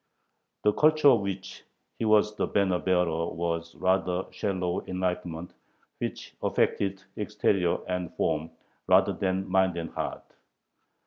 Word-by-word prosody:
The 105 - +4
culture 155 +1 +5
of 120 -6 +5
which 95 -1 -5 0.4
he - - 0
was 105 -1 +4
the - - 0
banner 95 -3 +1
bearer 85 -3 +1
was 85 0 -3
a - - -18
rather 95 0 +1
shallow 95 -3 -2
enlightenment, 90 -2 -3 0.5
which - - -5
affected 95 -1 0
exterior 105 -4 +1
and 90 -2 -2
form 80 +2 0 0.4
rather - - +5
than 95 0 -1
mind 95 -2 +2
and 85 -1 -4
heart. - - -4
95 Hz, 130 wpm, -28 LUFS, 90-100 Hz, 0.5 s, culture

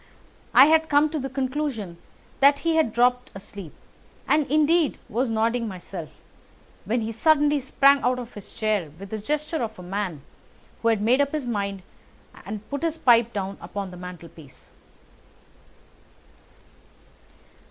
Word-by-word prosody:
I - - +10
had 320 +1 +3
come 295 +1 +3
to 315 - -2
the 270 0 -4
conclusion 260 - -3 0.4
that 280 +1 +6
he 330 -1 +2
had 315 -8 +2
dropped 250 +2 +2
asleep, 195 -4 -9 0.6
and 300 -2 +2
indeed 310 +1 +3
was 245 +3 -1
nodding 230 +1 0
myself, 180 -4 -7 0.8
when 230 +4 0
he 220 +1 -3
suddenly 295 +4 +3
sprang 275 +1 +4
out 250 +1 +1
of 245 -1 -8
his 205 - -11
chair 210 -7 -1
with 195 0 -10
the 220 - -3
gesture 300 +7 -2
of 220 -2 -4
a 180 - -10
man 180 -5 -4 0.6
who 230 - 0
has 225 -2 +3
made 240 +6 +3
up 280 +1 0
his 300 -4 -2
mind 200 -5 -3 0.6
and 210 +1 -6
put 285 - -3
his 330 -1 -1
pipe 235 -6 +4
down 195 -2 -4
upon 200 -2 -6
the - - -10
mantelpiece. 170 -5 -12
235 Hz, 150 wpm, -24 LUFS, 200-285 Hz, 0.8 s, I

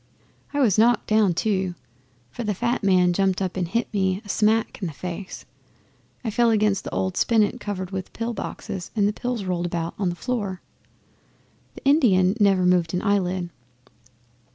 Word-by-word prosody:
I 290 - -2
was 220 -7 +3
knocked 235 +1 +4
down 215 -5 +3
too, 190 -3 0 0.6
for 240 - -5
the 210 -2 -1
fat 240 +4 -1
man 180 -2 +4
jumped 190 0 +1
up 190 -2 -2
and 180 -2 -1
hit 230 +7 -1
me 190 -2 +1
a - - -12
smack 220 +3 +1
in 185 - -1
the 160 - -6
face. 180 +4 -7 0.8
I 225 - -2
fell 235 +2 +3
against 210 -3 +1
an - - -2
old 185 -1 -1
spinet 225 +1 +2
covered 190 -4 -5
with 190 -1 -5
pill 235 +1 -3
boxes 190 -3 -6
and 205 -2 +3
the 210 - 0
pills 245 -1 -3
rolled 175 -2 -1
about 170 -1 -3
the 180 -4 0
floor. 205 -4 -3 1.2
The - - -13
Indian 215 - +4
never 195 -3 +4
moved 180 -1 +2
an 180 - -2
eyelid. 185 -4 0
195 Hz, 175 wpm, -24 LUFS, 185-220 Hz, 1.2 s, knocked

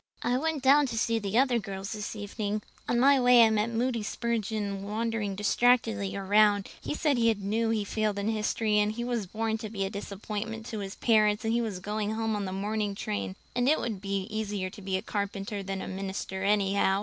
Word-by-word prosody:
"I 245 - +1
went 300 +1 -1
down 280 +2 +6
to 230 - -4
see 230 0 +1
the 205 +1 -1
other 255 -2 +4
girls 195 -1 -6
this 210 0 -4
evening. 210 0 -3 0.3
On 240 - +2
my 275 +2 +6
way 245 -1 +7
I 220 - +5
met 215 +1 +1
Moody 235 0 0
Spurgeon 215 -3 -2
wandering 210 0 -2
distractedly 220 -1 +2
around. 205 +1 +3
He - - -3
said 295 -6 +1
he 230 -1 +4
knew 215 +3 -1
he 225 -1 +1
had - - -10
failed 215 -1 0
in 200 +1 -2
history 215 -1 +1
and 210 +1 +1
he 235 +2 -4
was 240 -5 -2
born 220 +2 -2
to 215 -1 -5
be 195 -2 -2
a 195 - -4
disappointment 215 +2 -5
to 220 -2 -5
his 195 -1 -5
parents 215 -2 +3
and 225 - +1
he 235 - +2
was 215 -5 -3
going 210 +3 -2
home 225 -1 -1
on 205 -1 -2
the 185 - -4
morning 205 +1 -2
train; 100 - -3 0.2
and 245 +2 +2
it 310 - +4
would 220 -5 -3
be 195 -1 -1
easier 205 -3 -2
to 205 - -11
be 190 -1 -1
a - - -5
carpenter 200 0 -3
than 195 0 -4
a - - -6
minister, 190 0 -4
anyhow. 200 -1 +2
215 Hz, 220 wpm, -29 LUFS, 200-230 Hz, 0.3 s, way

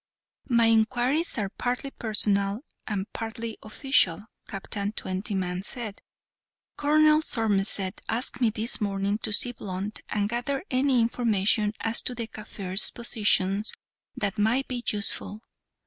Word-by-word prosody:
"My 235 -2 +5
inquiries 245 +8 +2
are 205 -3 -1
partly 250 +5 -2
personal 205 -2 +1 0.3
and 195 -2 -1
partly 225 0 -5
official," 215 - +1 0.2
Captain 200 +1 -3
Twentyman 185 -2 -2
said. 215 0 -4 0.7
"Colonel 305 +1 +5
Somerset 200 -6 +1
asked 245 +2 -1
me 235 - +5
this 220 +2 0
morning 200 0 0
to 220 - -3
see 240 +4 +2
Blunt, 200 -2 -5
and 205 -1 0
gather 245 +6 -2
any 255 -1 +3
information 215 -2 +2
as 225 +1 0
to 250 - -2
the 230 -1 -3
Kaffirs' 205 -3 0
positions 210 -3 +1 0.4
that 205 +1 -1
might 235 +6 +2
be 245 -2 -3
useful. 210 +1 -2
220 Hz, 125 wpm, -27 LUFS, 200-240 Hz, 0.7 s, My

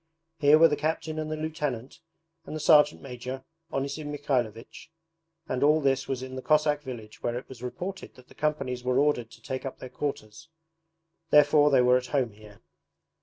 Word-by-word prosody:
Here 145 +1 +6
were 165 +1 +8
the 150 - 0
captain 155 +1 -2
and 155 0 -4
the 155 - -2
lieutenant 150 -6 -4 0.5
and - - -6
the - - -3
sergeant 150 -1 +5
major, 130 0 -6 0.3
Onisim 140 +2 -3
Mikhaylovich, 125 -3 -3 0.6
and 125 - -2
all 150 +2 +5
this 135 -2 +1
was 130 -1 -3
in 130 0 -7
the 130 - -5
Cossack 150 0 +2
village 120 -6 -9
where 120 0 -1
it 125 - -8
was 130 -3 -12
reported 180 +10 -6
that 125 -1 -17
the - - -17
companies 135 -5 -2
were 125 0 +1
ordered 140 -5 +2
to - - -17
take 130 0 -4
up 135 - -6
their 130 - -9
quarters: 135 0 -5 0.8
therefore 150 0 +6
they 135 -3 +5
were 125 0 +5
at 125 0 -4
home 125 -2 0
here. 105 0 -16
135 Hz, 185 wpm, -27 LUFS, 125-150 Hz, 0.8 s, were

